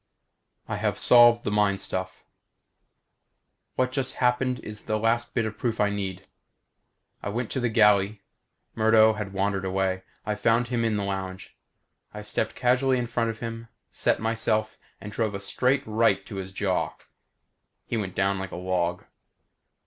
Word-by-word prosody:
I - - -3
have - - -1
solved 120 -1 +6
the - - -2
mind 105 -2 +2
stuff. 95 -1 -4 1.5
What 130 0 +1
just 130 -1 -2
happened 125 0 +1
is 105 0 -7
the 110 - 0
last 115 +2 0
bit 115 - +1
of 110 0 -5
proof 115 -2 -1
I 105 -1 +3
need. 95 -2 -4 1.0
I - - -4
went 115 +2 -3
to - - -1
the 120 -1 0
galley. 105 -2 +3 0.5
Murdo 110 0 +5
had 105 -2 -5
wandered 100 0 -1
away. 95 0 -1 0.2
I 105 - 0
found 115 +3 +1
him 120 -2 0
in 110 -2 +1
the 100 - -1
lounge. 95 -1 -5 0.6
I 105 - -6
stepped 110 +1 -2
casually 130 +1 +2
in 120 - -1
front 115 -1 -1
of 115 - -6
him, 115 0 -5 0.2
set - - +1
myself, 110 -1 0 0.2
and 105 - -8
drove 110 -1 -1
a - - -3
straight 125 +7 +1
right 110 -3 +2
to 100 - -7
his 95 0 -5
jaw. 95 -1 -1 0.9
He - - -3
went 100 -5 -3
down 95 0 +1
like 95 -1 -5
a - - -6
log. 90 -1 -1
110 Hz, 165 wpm, -26 LUFS, 100-115 Hz, 1.5 s, solved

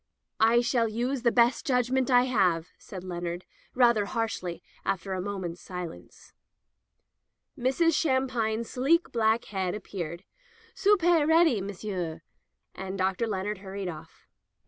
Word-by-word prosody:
"I 230 +2 +5
shall 235 -1 +1
use 245 +4 -2
the 235 -1 +3
best 235 0 +3
judgment 255 0 +1
I 245 -1 +6
have,'' 180 -9 +1
said 185 -3 -9
Leonard 175 -1 -5 0.3
rather 235 -4 +4
harshly 200 -6 -3 0.2
after 190 +1 -2
a 185 - -2
moment's 185 -3 -5
silence. 175 - -9 1.2
Mrs. 270 +7 +2
Shampine's 250 -6 0
sleek 310 +7 +1
black 225 0 +2
head 190 -2 -2
ap 210 - -7
peared. 170 -2 -6 0.5
"Soopay 355 -5 +4
ready, 320 - +4
M'sieu," 185 -4 -4 0.5
and 190 0 -6
Dr. 190 +4 0
Leonard 205 -1 -3
hurried 195 -1 -5
out. 160 -1 -8
220 Hz, 125 wpm, -28 LUFS, 185-250 Hz, 1.2 s, I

